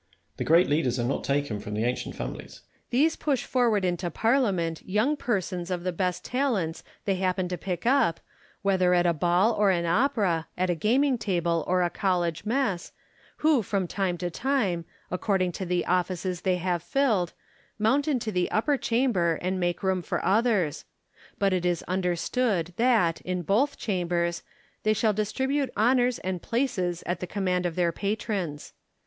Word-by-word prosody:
The - - -2
great 170 +3 +5
leaders 145 -5 +1
are - - 0
not 125 +3 -1
taken 140 -6 -1
from 105 +1 -6
the 110 - 0
ancient 125 +1 -2
families. - - -7
Lacy. - - -33 0.3
These 290 +7 +3
push 280 -4 0
forward 230 -6 +2
into 175 0 -1
Parliament 195 - +1
young 215 +10 +1
per 240 -8 0
sons 180 -1 -5
of 180 -2 -2
the 185 - -1
best 180 0 -2
talents 225 - -1 0.2
they 195 -2 +1
happen 185 -1 0
to 180 - -2
pick 180 0 -4
up, 245 - +3 0.4
whether 185 -2 +3
at 175 0 +3
a 170 - +3
ball 175 +7 +2
or 210 -2 +3
an 170 -2 +1
opera, 195 - +1
at 185 0 +1
a - - +2
gaming 245 - +2
table 170 -5 0
or 180 0 +2
a 175 - 0
college 175 -1 -1
mess, 220 -7 -1 0.5
who 305 -6 +5
from 195 -2 -1
time 185 -1 -1
to 175 0 -3
time, 205 -8 0 0.3
according 185 0 0
to 185 +1 -5
the 175 0 0
offices 180 0 -1
they 185 -1 +1
have 180 -1 -1
filled, 220 - +1 0.4
mount 245 +8 +2
into 245 -7 0
the 180 -2 0
upper 280 +7 +1
chamber 230 -11 +1
and 185 +1 -2
make 175 0 -1
room 190 -1 +1
for - - -3
others; 205 - +2 0.5
but 195 -1 +2
it 180 -2 0
is 175 -2 0
understood 180 +1 0
that, 225 -9 +3
in 180 -1 -3
both 240 - +1
chambers, 175 -4 -1 0.4
they 215 - +2
shall 215 0 +2
dis 215 +1 -1
tribute 270 0 0
honours 245 +2 +3
and 185 -2 -4
places 195 -9 -1
at 175 0 -2
the 180 - -4
command 180 -2 0
of 165 - -5
their 175 -2 +2
patrons. 195 -6 -3
185 Hz, 180 wpm, -27 LUFS, 175-225 Hz, 0.5 s, great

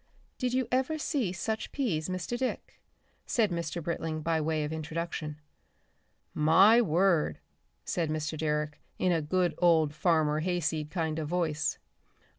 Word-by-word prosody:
"Did 250 0 0
you 260 -2 +1
ever 265 +5 +1
see 275 - -1
such 220 +4 -3
peas, 185 - -1
Mr. 185 +5 -3
Dick?" 255 +1 -4 0.5
said 220 -5 +2
Mr. 170 0 -3
Britling 160 -1 -3
by 165 0 +1
way 155 0 0
of 150 +1 -3
introduction. 155 -1 -4 1.0
"My 190 +10 +6
word," 175 -4 +2 0.5
said 165 -3 -1
Mr. 155 0 -2
Direck 150 -1 -1 0.2
in 185 - +2
a 165 -2 +2
good 175 +2 +1
old 160 -4 +4
Farmer 155 -2 +2
Hayseed 160 -3 -1
kind 160 -2 -2
of 155 - -3
voice. 160 -2 0
165 Hz, 140 wpm, -29 LUFS, 155-185 Hz, 1.0 s, My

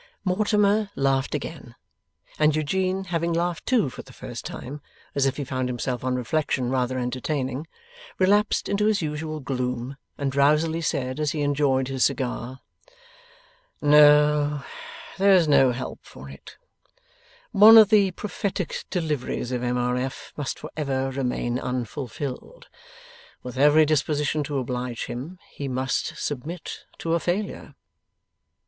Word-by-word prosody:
Mortimer 205 +2 +2
laughed 135 +1 +1
again, 145 -5 -7 0.6
and 150 -1 +4
Eugene, 185 +5 0
having 170 -2 -1
laughed 170 0 -2
too 235 - +3
for 130 - -7
the - - -16
first - - -8
time, 145 +4 -7 0.3
as 140 -1 +2
if 135 - -2
he 145 - -2
found 130 -1 -2
himself 125 0 -3
on 130 0 0
reflection 125 0 -1
rather 130 0 0
entertaining, 130 +3 -3 0.5
relapsed 205 +3 +2
into 205 +1 +1
his 210 -5 +1
usual 155 +1 -4
gloom, 125 -1 -3 0.2
and 140 -1 -1
drowsily 150 +4 +2
said, 130 -3 -2
as 150 -2 0
he 155 - -2
enjoyed 140 -2 +1
his 130 -1 0
cigar, 130 0 -2 1.2
'No, 150 -1 +5 0.6
there 195 0 +6
is 175 -4 +5
no 135 -3 +5
help 125 +1 -5
for - - -12
it; - - -13 0.9
one 220 +1 +9
of 215 -2 +8
the 205 -3 +5
prophetic 190 -1 -4
deliveries 150 -8 -2
of 125 -1 -2
M. 125 0 -1
R. 125 0 0
F. 130 +1 -5
must 145 -2 -4
for - - -9
ever 135 -3 -1
remain 125 -2 -2
unfulfilled. 130 - -5 0.7
With 125 0 -7
every 150 +3 +5
disposition 150 0 0
to 145 0 -3
oblige 125 -2 -3
him, 140 +10 -7
he 140 - -5
must 130 0 -2
submit 155 +5 -5
to 165 - -2
a 170 - +2
failure. 190 +5 -3
145 Hz, 140 wpm, -25 LUFS, 130-165 Hz, 1.2 s, one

